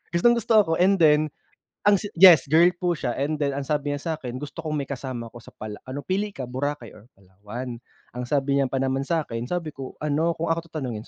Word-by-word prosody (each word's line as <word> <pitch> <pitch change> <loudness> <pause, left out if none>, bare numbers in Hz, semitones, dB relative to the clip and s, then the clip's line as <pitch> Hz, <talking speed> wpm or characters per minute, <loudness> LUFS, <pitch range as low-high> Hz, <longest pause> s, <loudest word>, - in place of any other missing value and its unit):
Gustong-gusto 235 +4 +3
ako. 165 - -3
And 195 +2 +5
then, 150 -3 +5 0.7
ang 205 - +7
si 205 - -5
yes 175 -7 +9
girl 170 +2 +7
po 175 -1 0
siya, 125 -5 -3
and 150 +2 -2
then 140 -1 +1
ang 140 - -3
sabi 145 0 -1
niya 160 +3 -4
sa'kin, 125 -4 -7
"Gusto 145 +3 -8
kong 155 -1 -2
may 140 -2 -3
kasama 125 -4 -5
ko 120 - -11
sa 115 - -16
pala 105 -1 -7
ano 140 +2 -5
pili 200 +2 -2
ka, 130 - -5
Boracay 130 0 -4
or 110 +2 -17
Palawan?" 105 +6 -8 0.3
Ang 125 +1 -5
sabi 140 0 +1
niya 135 - +2
pa 130 - -5
naman 135 +1 -1
sa'kin, 125 -8 -2
sabi 165 0 -3
ko 135 -2 -9
ano, 160 +3 +1
"Kung 165 0 -2
ako 165 0 -2
tatanungin." 125 -9 -5
145 Hz, 220 wpm, -24 LUFS, 125-165 Hz, 0.7 s, yes